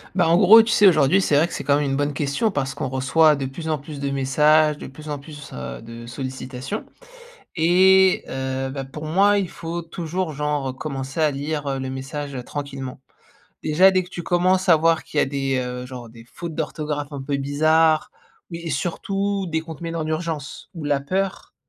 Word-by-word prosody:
Ben 180 - +3
en 165 +1 +4
gros, 220 +4 +9
tu 225 0 -1
sais, 205 - +6
aujourd'hui 170 +1 +5
c'est 150 -6 +2
vrai 160 +3 +4
que - - -12
c'est - - -5
quand 140 - +3
même 150 - 0
une 135 - 0
bonne 145 0 -1
question, 145 - 0
parce 135 -7 -2
qu'on 135 - -3
reçoit 145 +4 +3
de 135 - -3
plus 160 +5 -6
en 155 -2 0
plus 145 0 -9
de 140 0 -2
messages, 150 +3 +3
de - - -8
plus 150 +4 -11
en 145 - -3
plus, 150 0 -11
heu, 65 -1 -7
de 115 +1 -10
sollicitations. 130 +1 -6 0.7
Et 185 +3 +5
heu, 130 0 -3
ben, 135 0 -5
pour 150 +3 -9
moi, 200 +6 +4
il 190 -3 -1
faut 170 +1 -5
toujours 165 0 -4
genre, 145 -1 -2
heu, - - -6
commencer 135 +1 -5
à 155 -1 +4
lire 145 -1 -3
le 130 0 -4
message, 135 +2 -5
heu, 125 - -4
tranquillement. 135 -1 -6 0.6
Déjà, 170 +5 +5
dès 185 -1 +2
que 180 - -16
tu 175 - -6
commences 185 +2 +1
à 165 - +8
voir 165 +1 +2
qu'il 150 - -5
y - - +6
a - - 0
des, 135 -1 -1
heu, 125 0 -4
genre 125 -2 -9
des 115 0 -14
fautes 170 -2 -6
d'orthographe 150 -2 -3
un 140 -1 -5
peu 140 +1 -1
bizarres 155 +3 +2 0.4
et 170 0 -6
et - - -2
surtout 195 +6 -2
des 160 0 -1
comptes 160 -2 -9
mails 165 0 -4
en 155 -1 -2
urgence 155 -3 -4
ou 165 -3 -7
la 145 -1 +1
peur, 190 +6 -3
150 Hz, 215 wpm, -22 LUFS, 135-165 Hz, 0.7 s, gros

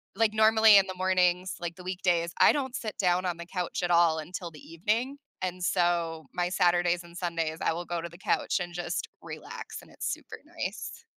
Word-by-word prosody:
like, 225 -2 +2
normally 220 -1 +7
in 195 -1 +4
the 185 - -5
mornings, 185 0 +1
like, 175 -1 -4
the 180 - -10
weekdays, 175 -2 0
I - - +8
don't 265 -3 -2
sit 215 -2 -5
down 180 -1 +2
on 175 -2 -1
the 170 - -7
couch 180 -1 -3
at 175 - 0
all 170 -2 +5
until 170 +2 -6
the 150 - -13
evening. 220 - -2 0.3
And 180 0 -3
so, 170 -3 +1
my 175 0 0
Saturdays 175 -1 +2
and 170 0 -15
Sundays, 165 -3 -2
I - - +2
will 175 +1 -5
go 170 0 -3
to 170 - -6
the 170 - -14
couch 195 - 0
and 175 -1 -5
just 175 0 -3
relax - - -8
and - - -18
it's - - -3
super - - -7
nice. - - -6
175 Hz, 210 wpm, -28 LUFS, 170-185 Hz, 0.3 s, I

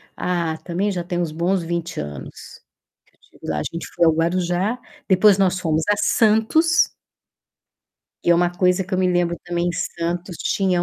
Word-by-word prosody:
ah, 170 -3 -1
também 185 +4 -1
já 175 -3 -3
tem 175 0 -3
uns 165 -3 -2
bons 175 +4 0
20 170 - -4
anos 75 -3 -8 0.5
que - - -34
eu - - -45
estive - - -8
lá. 75 - -1
A - - -2
gente 170 - -5
foi 170 - +3
ao 160 - +5
Guarujá, 180 +7 0 0.3
depois 195 +1 +5
nós 185 -1 +2
fomos 160 -3 0
a 205 - +3
Santos. 225 +11 +3 1.3
Que - - -2
é 170 - +7
uma 175 +1 +2
coisa 180 0 +2
que 190 - -15
eu 185 - +1
me 185 -1 +2
lembro 175 -1 +1
também, 175 0 -1
em - - -2
Santos 170 +1 -3
tinha 185 -1 0
175 Hz, 190 wpm, -21 LUFS, 170-190 Hz, 1.3 s, é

